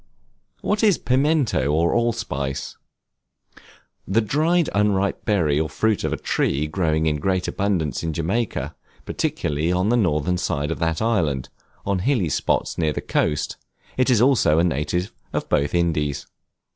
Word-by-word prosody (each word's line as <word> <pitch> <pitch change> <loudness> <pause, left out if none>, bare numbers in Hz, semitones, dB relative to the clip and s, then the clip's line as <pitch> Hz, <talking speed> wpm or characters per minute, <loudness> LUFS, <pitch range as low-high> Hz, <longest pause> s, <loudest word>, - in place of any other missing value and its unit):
What 210 +1 0
is 205 -6 +5
Pimento 130 - +1
or 80 +3 +2
Allspice? 105 - -2 1.3
The 95 +4 +2
dried 155 +10 +1
unripe 100 -1 +1
berry 85 -9 +2
or 80 0 -1
fruit 110 +7 0
of - - -1
a - - -1
tree 70 +3 0
growing 80 -1 0
in 75 -1 +1
great 95 +3 0
abundance 90 -8 -1
in 80 - -2
Jamaica, 95 +9 -2 0.3
particularly 75 +4 -1
on 90 +3 +1
the 120 - +3
northern 90 -3 +1
side 75 -4 -1
of - - -3
that 80 +4 0
island, 80 - 0 0.4
on 100 -2 0
hilly 100 - +1
spots, - - -1
near 80 -2 +1
the - - -3
coast; 75 -1 -1 0.4
it 130 +1 +2
is 120 -4 +4
also 125 - +4
a 85 - +4
native 90 +4 -1 0.2
of - - -2
both 70 +4 +1
Indies. 75 -5 0
90 Hz, 150 wpm, -22 LUFS, 75-110 Hz, 1.3 s, is